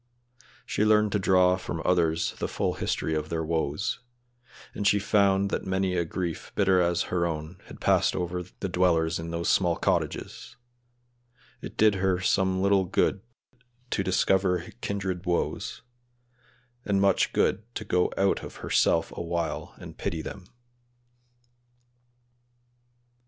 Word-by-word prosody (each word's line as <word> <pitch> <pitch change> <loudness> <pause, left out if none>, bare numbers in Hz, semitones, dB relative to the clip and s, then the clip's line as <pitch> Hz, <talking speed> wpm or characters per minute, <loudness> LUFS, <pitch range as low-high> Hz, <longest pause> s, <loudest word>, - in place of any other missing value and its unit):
She - - 0
learned 105 -1 +4
to 105 - +1
draw 90 -1 +4
from 90 -2 -5
others 85 -2 +2
the - - -1
full - - -1
history 80 - -2
of 75 0 -2
their 80 -1 -2
woes; 80 +4 -1 0.7
and 100 - -1
she 105 - +4
found 100 -1 +2
that - - -1
many 95 -1 0
a 85 - +1
grief 85 -1 -4
bitter 95 -2 +3
as 85 0 +1
her 85 -1 +2
own 80 +2 -6
had - - -11
passed - - +2
over 90 0 -2
the 90 +2 -7
dwellers 85 -3 +2
in 80 0 -5
those 85 0 -3
small 90 -3 +3
cottages; - - -2 1.1
it - - -9
did 110 -1 +5
her 95 -2 +2
some 95 0 +1
little 100 -1 +3
good 95 +2 +1 0.7
to 95 - 0
discover 95 -1 +1
kindred 95 -2 -3
woes, 85 -1 -2 1.0
and 100 -4 +1
much 100 -1 +3
good - - +1
to 110 - -4
go 90 -3 +1
out 95 0 +1
of - - -9
herself - - +2
a - - -4
while 85 -1 -3
and - - -11
pity 80 -2 -3
them. 95 -3 -8
90 Hz, 140 wpm, -27 LUFS, 85-95 Hz, 1.1 s, did